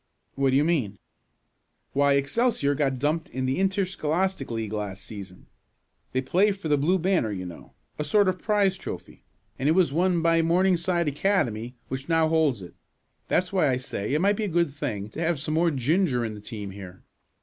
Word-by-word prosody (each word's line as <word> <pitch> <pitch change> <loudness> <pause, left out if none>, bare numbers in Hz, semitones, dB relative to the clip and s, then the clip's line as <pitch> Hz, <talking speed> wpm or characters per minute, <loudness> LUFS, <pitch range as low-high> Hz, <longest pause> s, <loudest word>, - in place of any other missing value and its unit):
"What 135 -1 +1
do 130 - +2
you 140 - +4
mean?" 135 - 0 1.0
"Why, 140 0 +3
Excelsior 145 - +1
got 135 -2 0
dumped 150 +5 -1
in 130 +1 -3
the 130 +6 0
interscholastic 190 -4 0
league 110 -2 -3
last 100 -2 -4
season. 95 -4 -10 0.7
They 130 - 0
play 190 +10 +3
for 195 -5 -6
the 145 - +4
blue 175 +7 +3
banner 180 - +1
you 90 -2 -4
know 85 -2 -11 0.2
a - - 0
sort 200 +7 +3
of 185 0 0
prize 200 -3 +2
trophy - - -8 0.4
and 135 +4 +1
it - - +5
was 170 -6 +3
won 175 0 +2
by 165 0 +4
Morningside 175 0 +2
Academy, 130 - 0
which 130 +4 -6
now 165 -1 +3
holds 155 - +2
it. 90 - -11 0.5
That's 180 +1 0
why 180 -6 +3
I 125 - +1
say 125 -1 -3
it 155 - +1
might 200 +2 +3
be 215 - -1
a 175 -4 -2
good 170 -5 +2
thing 105 -8 -4
to 130 - -9
have 170 -2 0
some 155 +2 -3
more 170 +2 +3
ginger 140 -2 +1
in 110 - -4
the 105 - -9
team 105 -2 -7
here. 95 -2 -11
150 Hz, 195 wpm, -26 LUFS, 125-180 Hz, 1.0 s, it